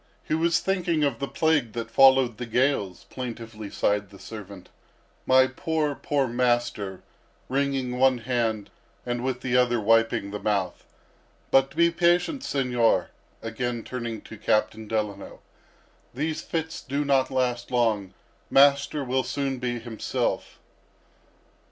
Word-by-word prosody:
He - - -3
was 165 +1 +2
thinking 175 -5 0
of 140 -5 0
the 140 - -2
plague 150 -9 +1
that 115 -1 -5
followed 130 -2 +5
the 120 - -5
gales," 115 -7 0
plaintively 115 -4 -6
sighed 105 -1 0
the 100 - -14
servant; 100 -2 -10 0.6
"my 130 0 +6
poor, 150 +3 -1
poor 140 -1 -1
master!" 120 -6 -1 0.5
wringing 135 -2 -1
one 130 -1 +4
hand, 115 -3 -2 0.3
and 120 0 -2
with 130 -1 -2
the 125 -1 -1
other 125 -1 +3
wiping 115 -2 +2
the 105 - -4
mouth. 100 -4 -1 0.7
"But 135 +1 +3
be 170 +1 +4
patient, 175 - +2
Señor," 125 - +1 0.3
again 115 +1 -3
turning 115 -3 -5
to 110 - -11
Captain 110 0 0
Delano, 105 -2 -3 0.8
"these 155 +4 -2
fits 160 -1 -4
do 140 +2 -2
not 135 -2 +2
last 125 -2 -1
long; 110 -6 0 0.3
master 140 +1 +4
will 130 0 0
soon 135 +1 -2
be 120 -1 -2
himself." 115 -1 -3
125 Hz, 135 wpm, -26 LUFS, 115-140 Hz, 0.8 s, my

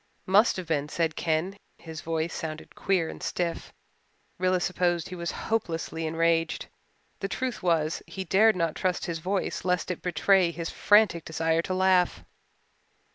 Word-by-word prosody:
"Must 200 +4 +4
have 185 - -4
been," 150 -2 -1
said 160 -1 -1
Ken. 165 +4 -1 0.2
His 160 -2 -8
voice 165 0 -2
sounded 155 -1 -6
queer 185 -4 0
and - - -8
stiff. 170 -2 -3 0.7
Rilla 185 0 +2
supposed 175 -1 0
he 185 - -6
was 170 -1 -3 0.2
hopelessly 165 -5 -2
enraged. 165 +1 +1 0.5
The 195 - -2
truth 245 -1 -3
was 165 -3 +1
he 190 - -5
dared 210 +5 +4
not 165 -3 0
trust 180 0 -1
his 170 -2 -3
voice 190 +4 -2
lest 180 0 0
it 180 - -5
betray 180 +1 +3
his 170 -1 -5
frantic 205 -6 +4
desire 160 0 0
to 185 +2 -3
laugh. 180 - +2
170 Hz, 155 wpm, -27 LUFS, 165-185 Hz, 0.7 s, Must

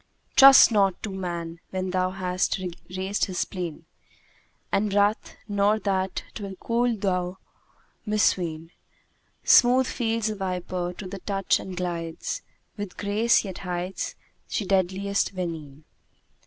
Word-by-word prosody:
'Trust 270 -2 +9
not 195 -4 +2
to 210 - -3
man 170 -3 -5
when 185 -1 -3
thou 185 0 +1
hast 185 0 -1 0.4
raised 190 +2 0
his 185 -2 -6
spleen 175 -5 -4 0.4
* - - -37
And 205 +1 +1
wrath, 205 +2 +1
nor 205 +1 +2
that 190 -3 -1
'twill 200 -3 -6
cool 235 +1 +1
do - - -5
thou 180 -2 -1 0.7
misween: 170 -6 0 0.7
Smooth 255 +1 +6
feels 230 -2 -1
the 215 - 0
viper 180 -2 -3
to 205 - -7
the 195 +1 -7
touch 195 0 0
and 185 -1 -7
glides 170 -2 -3 0.2
* - - -43
With 205 -3 -6
grace, 210 +3 +2
yet 190 -2 -6
hides 180 0 -4 0.3
she 210 - -2
deadliest 195 +1 0
venene.'" 160 -5 -5
190 Hz, 135 wpm, -25 LUFS, 180-205 Hz, 0.7 s, Trust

